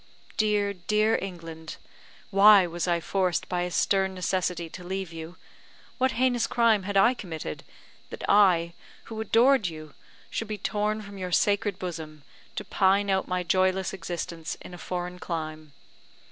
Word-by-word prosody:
Dear, 210 -2 +1
dear 210 +4 +1
England! 165 -4 -7 0.5
why 200 -1 +7
was 175 +1 -3
I 170 -1 +2
forced 185 +1 0
by 180 -1 -1
a 180 - -1
stern 190 +1 +1
necessity 180 -1 -1
to 180 +3 -10
leave 190 -1 -4
you? 165 +2 -8 0.6
What 260 0 +2
heinous 245 -2 +1
crime 230 -4 +3
had 200 +1 -2
I 235 +6 +6
committed, 160 - -6 0.5
that - - -7
I, 175 -5 +4 0.3
who 220 -1 -6
adored 230 0 +4
you, 155 -2 -8 0.4
should 225 - -3
be 215 0 -4
torn 210 +1 -1
from 200 -1 -10
your 180 -1 -4
sacred 205 +2 +2
bosom, 160 -5 -7 0.3
to 210 - -4
pine 195 +1 +2
out 190 0 +1
my 180 0 -1
joyless 185 +2 +1
existence 170 -2 -5
in - - -11
a 175 - -9
foreign 180 +1 -4
clime? 155 -3 -5
185 Hz, 155 wpm, -27 LUFS, 170-205 Hz, 0.6 s, why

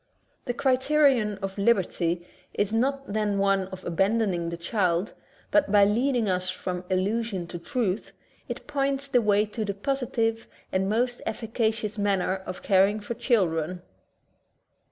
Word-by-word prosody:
The 245 - -2
criterion 265 -5 +3
of 195 +1 -4
liberty 180 -5 +1 0.3
is 205 +1 0
not 275 +4 +1
then 210 -2 0
one 195 -1 +2
of 190 -1 -10
abandoning 190 -1 +1
the 170 - -5
child, 180 0 0 0.4
but 300 -10 +3
by 205 -1 +6
leading 240 +2 +1
us 185 -1 0
from 185 -1 -4
illusion 195 0 0
to 175 - -6
truth, 225 -2 -2 0.4
it - - -5
points 275 -1 -1
the 250 -3 +3
way 210 -1 +3
to 215 +1 -4
the 200 -2 -3
posi 265 +4 -2
tive 225 0 0 0.2
and 190 +1 0
most 245 +3 0
efficacious 220 -2 -2
manner 195 -2 +1
of 185 - -6
caring 200 +2 +4
for 210 +3 -5
children. 180 - 0
210 Hz, 145 wpm, -26 LUFS, 190-235 Hz, 0.4 s, by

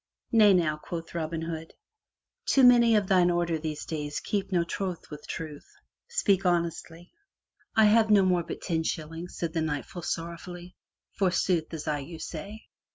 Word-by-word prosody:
"Nay 210 -4 +6
now," 155 -4 +1
quoth 165 +2 -7
Robin 165 -1 -3
Hood, 165 -1 -6 0.7
"too 270 - +4
many 240 -2 +7
of 210 -2 +3
thine 185 -2 +4
order 170 -2 0
these 155 -1 -4
days 150 -2 -3
keep 200 -1 -2
no 175 -2 +2
troth 180 0 -5
with 150 - -9
Truth.. 155 -3 -6 0.4
Speak 200 - +2
honestly/* 170 -1 -1 0.6
"I 220 -1 +6
have 215 +1 +5
no 205 -2 +6
more 180 -2 +3
but 170 - -7
ten 165 -3 0
shillings,*' 165 +2 -5
said 165 -2 -3
the 165 - 0
Knight 150 -3 -2
full 175 - -8
sor 165 +1 -3
rowfully, 175 +1 -10 0.4
"for 195 -2 +2
sooth 175 -2 0
as 155 - -7
I 150 -1 0
you 160 +4 -8
say! 195 +7 -7
170 Hz, 175 wpm, -28 LUFS, 160-190 Hz, 0.7 s, many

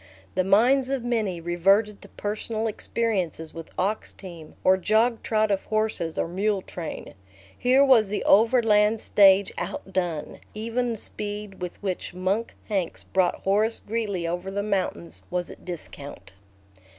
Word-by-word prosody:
The 185 - +1
minds 245 +8 +4
of 270 -3 -1
many 220 -7 -1
reverted 195 +5 +2
to - - -13
personal 215 +2 -3
experiences 200 -7 -2
with 165 -1 -8
ox 205 +4 -1
team, 170 -5 -11
or 185 - +6
jogtrot 220 +1 +1
of 195 - 0
horses 215 -7 -1
or - - 0
mule 195 +2 0
train. 170 -3 -7 0.4
Here 260 +3 +4
was 230 -7 +5
the 210 - -2
Overland 220 -1 +4
Stage 195 -1 +5
outdone; 175 -5 -3 0.2
even 230 +3 -1
the 230 - -2
speed 205 -2 -6
with 180 -1 -5
which 185 -2 -3
Monk 190 +5 -1
Hanks 195 -6 -2
brought 185 -2 0
Horace 215 +4 +2
Greeley 205 -5 -2
over 175 +3 -3
the 200 +1 -2
mountains 95 - -2
was 180 -1 -2
at - - -14
discount. 145 - -8
200 Hz, 140 wpm, -25 LUFS, 180-220 Hz, 0.4 s, or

